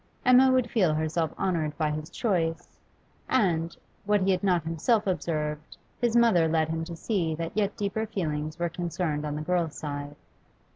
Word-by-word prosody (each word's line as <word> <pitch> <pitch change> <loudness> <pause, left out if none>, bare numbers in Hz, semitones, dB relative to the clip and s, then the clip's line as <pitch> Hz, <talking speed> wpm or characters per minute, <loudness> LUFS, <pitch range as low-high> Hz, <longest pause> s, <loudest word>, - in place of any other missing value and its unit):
Emma 255 +1 +7
would 255 -2 +2
feel 180 -9 +3
herself 160 +1 -1
honoured 165 -6 -1
by 155 -2 0
his 155 +1 -5
choice, 170 -5 -1 0.5
and, 170 -9 +1 0.3
what 205 -1 +2
he 195 - +3
had 185 0 0
not 180 -4 +2
himself 185 +8 +1
observed, 155 -4 -2 0.2
his 240 -1 +1
mother 225 -9 +5
led 160 0 +1
him 160 0 -2
to 170 +1 -6
see 165 -3 -1
that 165 +1 -4
yet 205 -1 0
deeper 210 +2 -2
feelings 155 -5 -3
were 170 0 0
concerned 165 -3 -2
on 150 - -3
the 150 - -4
girl's 165 -3 -1
side. 145 -1 -5
165 Hz, 175 wpm, -27 LUFS, 155-195 Hz, 0.5 s, Emma